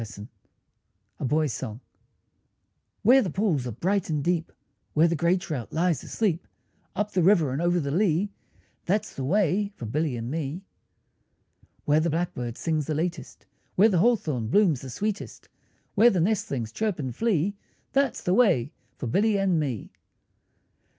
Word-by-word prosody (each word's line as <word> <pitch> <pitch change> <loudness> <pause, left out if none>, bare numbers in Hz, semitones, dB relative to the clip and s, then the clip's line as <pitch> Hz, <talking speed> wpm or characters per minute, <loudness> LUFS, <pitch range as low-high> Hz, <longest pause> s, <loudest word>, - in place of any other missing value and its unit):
TWO - - -3
SONGS 105 0 -10 0.9
A - - -2
BOY'S 150 0 +1
SONG 115 -3 -5 1.2
Where 255 +5 +7
the 195 - -1
pools 170 - 0
are - - -3
bright 185 - -1
and 150 -3 -1
deep, 170 0 0 0.4
Where 160 +2 +5
the 170 - 0
grey 170 +4 +2
trout 150 - -5
lies 170 -1 0
asleep, 185 -7 -1 0.5
Up 210 0 -1
the 185 - +1
river 170 -6 +4
and 140 - -2
over 175 0 +2
the 140 -3 -2
lea, 190 +3 +1 0.6
That's 205 +4 0
the 135 - -5
way 200 +5 +1
for 120 - -7
Billy 145 +3 -1
and 115 +2 -4
me. 160 +3 -3 1.2
Where 150 +1 +4
the 165 +2 +1
blackbird 135 -8 -3
sings 155 -3 -1
the 155 - -1
latest, 170 +2 -4 0.3
Where 210 +4 +6
the 185 -5 +2
hawthorn 160 - +1
blooms 165 - +3
the 135 - -8
sweetest, 205 - -4 0.4
Where 225 +3 +6
the 190 - 0
nestlings 150 - -1
chirp 215 - -1
and 130 -6 -4
flee, 200 - +1 0.4
That's 275 0 +1
the 180 - +1
way 185 - +3 0.3
for - - -5
Billy 205 - +2
and 190 -4 +2
me. 130 -9 -3
165 Hz, 165 wpm, -26 LUFS, 140-200 Hz, 1.2 s, Where